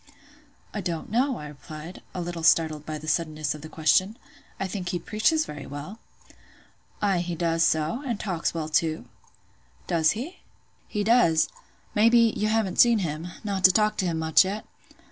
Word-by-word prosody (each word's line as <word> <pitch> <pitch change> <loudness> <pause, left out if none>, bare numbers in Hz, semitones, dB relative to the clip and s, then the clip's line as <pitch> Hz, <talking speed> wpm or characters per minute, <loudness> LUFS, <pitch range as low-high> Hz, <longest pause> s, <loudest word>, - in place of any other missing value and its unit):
"I 210 - -3
don't 175 0 -4
know," 255 +3 +1
I 150 - -7
replied, 155 +3 -10
a 180 - -2
little 175 -1 -5
startled 155 -2 +3
by 155 -1 -3
the 155 +1 -10
suddenness 155 -3 -1
of 150 - -10
the 155 - -9
question; 165 +8 +2 0.4
"I 195 - -1
think 185 -2 -4
he 180 - -1
preaches 215 - +1
very 150 -2 -8
well." 145 +10 -8 1.0
"Ay, 195 -3 +2
he 175 0 -3
does 165 0 +1
so; 160 - +1
and 240 -6 -3
talks 180 -5 -1
well 160 -2 -4
too." 155 -3 0 0.8
"Does 160 -3 +2
he?" 290 +11 -6 0.5
"He 210 - -2
does. 170 -8 +4 0.4
Maybe, 230 +1 +5
you 215 - 0
haven't 215 -4 0
seen 235 -1 +7
him—not 180 +5 -5
to 185 - +9
talk 210 +2 +2
to 185 - 0
him 165 -2 -1
much, 160 +2 +5
yet?" 200 +3 -4
175 Hz, 170 wpm, -26 LUFS, 155-210 Hz, 1.0 s, to